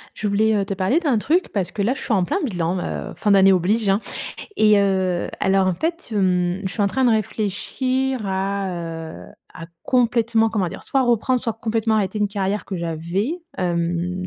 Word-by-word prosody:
Je 215 Hz, -, -3 dB
voulais, 215 Hz, +2 st, +2 dB
heu, 200 Hz, -, +1 dB
te 195 Hz, 0 st, -3 dB
parler 190 Hz, -, +2 dB
d'un 275 Hz, -10 st, +1 dB
truc 335 Hz, -, +1 dB
parce 195 Hz, -4 st, -1 dB
que 205 Hz, -, -2 dB
là, 235 Hz, +6 st, +1 dB
je -, -, -9 dB
suis -, -, -2 dB
en 190 Hz, -4 st, +3 dB
plein 175 Hz, -, -1 dB
bilan, 180 Hz, -, -1 dB
heu, -, -, -4 dB
fin 210 Hz, -, 0 dB
d'année 195 Hz, -1 st, +6 dB
oblige, 195 Hz, +4 st, +1 dB
hein. 195 Hz, +2 st, +3 dB, 0.6 s
Et 215 Hz, -1 st, +5 dB
heu, 190 Hz, -3 st, 0 dB
alors, 190 Hz, -1 st, +3 dB
en 185 Hz, -, +1 dB
fait, 335 Hz, -, -3 dB
hem, 180 Hz, -2 st, +1 dB
je 190 Hz, -, -2 dB
suis 215 Hz, -, -4 dB
en -, -, +3 dB
train 260 Hz, +7 st, 0 dB
de 245 Hz, -, +5 dB
réfléchir 255 Hz, +5 st, -1 dB
à, 195 Hz, +1 st, -1 dB, 0.6 s
heu, -, -, -16 dB, 0.2 s
à 165 Hz, -, -9 dB, 0.2 s
complètement, 235 Hz, -2 st, +2 dB
comment 210 Hz, -5 st, -1 dB
dire? -, -, -9 dB
Soit 270 Hz, -, +1 dB
reprendre, 245 Hz, +1 st, +2 dB
soit 230 Hz, -, -2 dB
complètement 225 Hz, 0 st, 0 dB
arrêter 205 Hz, 0 st, -1 dB
une 210 Hz, -1 st, +1 dB
carrière 200 Hz, 0 st, -2 dB
que 190 Hz, -, -5 dB
j'avais. 170 Hz, -, -2 dB, 0.2 s
Hem, 175 Hz, +1 st, -1 dB
200 Hz, 200 wpm, -21 LUFS, 185-230 Hz, 0.6 s, d'année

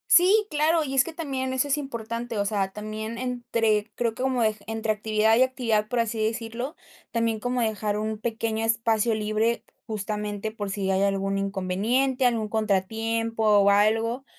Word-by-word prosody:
Sí, 390 Hz, +5 st, +6 dB
claro, 315 Hz, +2 st, +2 dB
y 270 Hz, -3 st, -4 dB
es 265 Hz, -, +6 dB
que 330 Hz, -, -7 dB
también 270 Hz, -5 st, -3 dB
eso 260 Hz, +2 st, 0 dB
es 285 Hz, +1 st, +1 dB
importante, 235 Hz, -3 st, -5 dB
o 200 Hz, -, +1 dB
sea, 195 Hz, -2 st, -1 dB
también 215 Hz, +2 st, -5 dB
entre, 230 Hz, -3 st, 0 dB
creo 235 Hz, -2 st, 0 dB
que 250 Hz, +3 st, -4 dB
como 255 Hz, -2 st, +1 dB, 0.2 s
entre 225 Hz, 0 st, -2 dB
actividad 215 Hz, +1 st, +2 dB
y 255 Hz, -, +6 dB
actividad, 230 Hz, -5 st, 0 dB
por 245 Hz, +1 st, 0 dB
así 230 Hz, 0 st, -1 dB
decirlo, 230 Hz, +6 st, -3 dB, 0.4 s
también, 230 Hz, -1 st, 0 dB
como 245 Hz, +2 st, -1 dB
dejar 215 Hz, -2 st, -1 dB
un 215 Hz, 0 st, -2 dB
pequeño 225 Hz, 0 st, -2 dB
espacio 225 Hz, 0 st, +2 dB
libre, 215 Hz, +2 st, 0 dB, 0.2 s
justamente, 210 Hz, 0 st, -3 dB
por 210 Hz, -2 st, -5 dB
si 195 Hz, -1 st, -1 dB
hay 190 Hz, 0 st, +2 dB
algún 195 Hz, 0 st, 0 dB
inconveniente, 205 Hz, +8 st, 0 dB
algún 225 Hz, -3 st, +1 dB
contratiempo 225 Hz, +2 st, -1 dB, 0.2 s
o 200 Hz, -, +5 dB
algo. 225 Hz, +5 st, +2 dB
225 Hz, 165 wpm, -26 LUFS, 210-245 Hz, 0.4 s, Sí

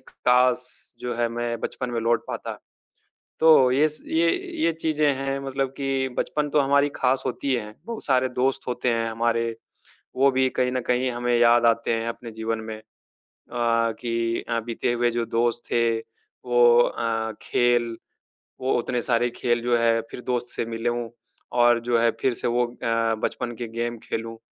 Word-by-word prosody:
काश 125 Hz, 0 st, +2 dB, 0.3 s
जो 120 Hz, -1 st, -3 dB
है 120 Hz, 0 st, +1 dB
मैं 120 Hz, 0 st, -3 dB
बचपन 125 Hz, -1 st, -4 dB
में 115 Hz, -1 st, -2 dB
लौट 115 Hz, +1 st, +1 dB
पाता। -, -, -5 dB, 0.8 s
तो 155 Hz, -6 st, +6 dB
ये 145 Hz, +4 st, +4 dB
स 150 Hz, -, -6 dB
ये 165 Hz, +1 st, +2 dB, 0.3 s
ये 165 Hz, -, +4 dB
चीजें 155 Hz, -2 st, +1 dB
हैं 135 Hz, 0 st, -2 dB
मतलब 135 Hz, 0 st, -1 dB
कि 135 Hz, -1 st, -1 dB
बचपन 150 Hz, -1 st, -1 dB
तो 150 Hz, -, +3 dB
हमारी 140 Hz, +1 st, +3 dB
खास 130 Hz, +1 st, +1 dB
होती 140 Hz, -2 st, -1 dB
है, 105 Hz, -2 st, -5 dB
बहुत 230 Hz, 0 st, -6 dB
सारे 130 Hz, -2 st, +2 dB
दोस्त 130 Hz, +2 st, -1 dB
होते 125 Hz, 0 st, -1 dB
हैं 115 Hz, 0 st, -1 dB
हमारे, 115 Hz, 0 st, 0 dB, 0.6 s
वो 135 Hz, +2 st, +4 dB
भी 130 Hz, 0 st, +2 dB
कहीं 125 Hz, 0 st, +2 dB
न 130 Hz, -, -1 dB
कहीं 125 Hz, +1 st, +1 dB
हमें 120 Hz, 0 st, 0 dB
याद 120 Hz, 0 st, +5 dB
आते 115 Hz, 0 st, +2 dB
हैं 115 Hz, 0 st, -2 dB
अपने 115 Hz, 0 st, -7 dB
जीवन 110 Hz, 0 st, -3 dB
में 110 Hz, -, -5 dB
अ, -, -, -14 dB, 1.2 s
कि 115 Hz, -1 st, -1 dB
अ, 115 Hz, 0 st, 0 dB
बीते 115 Hz, +1 st, -2 dB
हुए 120 Hz, 0 st, +1 dB
जो 120 Hz, 0 st, -1 dB
दोस्त 120 Hz, +1 st, 0 dB
थे 115 Hz, -1 st, +2 dB, 0.5 s
वो 120 Hz, -1 st, +6 dB
अ, 115 Hz, -2 st, -1 dB
खेल 120 Hz, -1 st, +1 dB, 0.6 s
वो 130 Hz, +1 st, 0 dB
उतने 120 Hz, 0 st, -2 dB
सारे 120 Hz, 0 st, +1 dB
खेल 120 Hz, -1 st, 0 dB
जो 120 Hz, 0 st, +2 dB
है 115 Hz, -1 st, +3 dB
फिर -, -, -7 dB
दोस्त 125 Hz, -1 st, -1 dB
से -, -, -1 dB
मिलूँ 115 Hz, +1 st, -2 dB, 0.5 s
और 120 Hz, 0 st, +5 dB
जो 120 Hz, -, +4 dB
है 115 Hz, 0 st, +4 dB
फिर 130 Hz, -, +1 dB
से -, -, -1 dB
वो 120 Hz, +1 st, +2 dB
अ, 120 Hz, -, -15 dB, 0.5 s
बचपन 120 Hz, -1 st, -2 dB
के 120 Hz, -1 st, -5 dB
गेम 120 Hz, +1 st, -3 dB
खेलूँ, 115 Hz, 0 st, -5 dB
120 Hz, 180 wpm, -24 LUFS, 115-130 Hz, 1.2 s, तो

